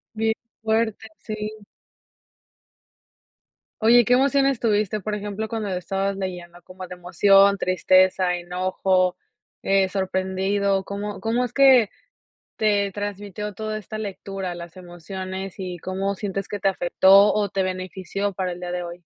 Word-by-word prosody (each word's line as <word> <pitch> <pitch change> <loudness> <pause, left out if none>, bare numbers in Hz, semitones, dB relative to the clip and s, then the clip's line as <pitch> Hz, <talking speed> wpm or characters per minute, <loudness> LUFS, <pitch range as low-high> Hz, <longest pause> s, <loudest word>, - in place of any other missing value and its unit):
Bien 220 0 +1 0.3
fuerte, 220 0 0
sí. 215 -1 -6 2.2
Oye, 235 0 +6
¿qué 245 - +3
emociones 275 0 +3
tuviste? 215 -2 +1
Por 210 +2 -3
ejemplo, 210 +1 -4
cuando 220 -2 -3
la 185 - -2
estabas 195 +2 -2
leyendo 175 -2 -6
como 185 +1 -10
de 180 - -8
emoción, 195 +3 +4
tristeza, 185 0 +3
enojo, 185 +1 0 0.5
eh, 195 -1 +2
sorprendido, 190 +1 0
¿cómo 200 +1 -5
cómo 230 +2 0
es 245 - -3
que 265 -6 +6 0.7
te 205 -2 +1
transmitió 205 0 -5
toda 215 0 -4
esta 215 +1 -7
lectura, 195 -3 -5
las 170 +1 -10
emociones 185 +2 -7
y 180 -2 -5
cómo 195 +2 -2
sientes 195 -1 -4
que 205 - -5
te 195 - +2
afectó 195 +3 +5
o 205 -2 0
te 195 -1 -1
benefició 185 +2 -3
para 185 -1 -2
el 175 - -10
día 175 0 -4
de 180 0 -2
hoy? 175 +1 -9
195 Hz, 140 wpm, -23 LUFS, 185-210 Hz, 2.2 s, Oye